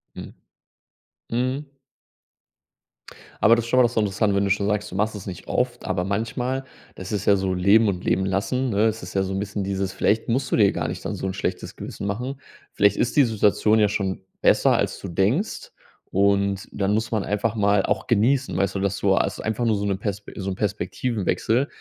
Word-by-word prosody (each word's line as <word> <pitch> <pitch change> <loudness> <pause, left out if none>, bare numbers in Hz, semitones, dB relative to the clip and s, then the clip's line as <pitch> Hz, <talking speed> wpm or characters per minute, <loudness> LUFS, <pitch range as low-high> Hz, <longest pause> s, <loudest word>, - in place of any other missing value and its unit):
Hm. - - -8 1.0
Mhm. 130 +4 -2 1.7
Aber 115 - +6
das 115 -1 -2
ist - - -7
schon 125 - +2
mal - - +7
das 120 - +2
ist - - -8
interessant, 105 -1 +1
wenn 100 - +2
du 100 - 0
schon 100 +1 +1
sagst, 105 0 -1
du - - -7
machst 105 +2 0
es 100 - -8
nicht 90 - -8
oft, 125 -1 -1
aber 95 -1 -1
manchmal, 115 +7 -2 0.3
das 95 0 -8
ist 105 -2 -2
ja 100 - +5
so 95 -1 -1
leben 100 +5 +4
und 90 -3 -2
leben 95 - +1
lassen, 110 +7 -1
ne, 105 +1 +2
es 110 -5 -4
ja 95 - +1
so 95 0 -3
'n 95 - -1
bisschen 100 0 -3
dieses 95 0 -2
vielleicht 110 +2 +1
musst 130 +2 0
du - - +3
dir 105 -3 +5
gar - - -2
nicht - - -5
dann - - -2
so - - -4
'n 95 - -3
schlechtes 90 -1 -4
Gewissen 100 - -6
machen. 125 +7 -4 0.3
Vielleicht 100 0 +3
ist 120 - 0
die 145 - +8
Situation 110 -1 +2
ja 105 -1 +4
schon 95 -2 -2 0.2
besser, - - +4
als - - -1
du - - -7
denkst 100 - -1 0.4
und 100 0 +1
dann 100 0 0
muss 110 +1 -1
man 110 -4 0
einfach 105 +2 -1
mal 100 -2 +3
auch 95 -2 -1
genießen, 125 +4 +2
weißt 100 - 0
du, - - -1
dass 100 0 -1
du, 95 -1 +3
also - - -1
einfach 110 +2 -1
nur 110 -2 +2
so 100 0 -2
'ne 100 -1 0
Pers 100 0 -4
so 95 -1 -3
'nen 95 - -3
Perspektivenwechsel, 110 +4 -1
105 Hz, 215 wpm, -23 LUFS, 95-115 Hz, 1.7 s, die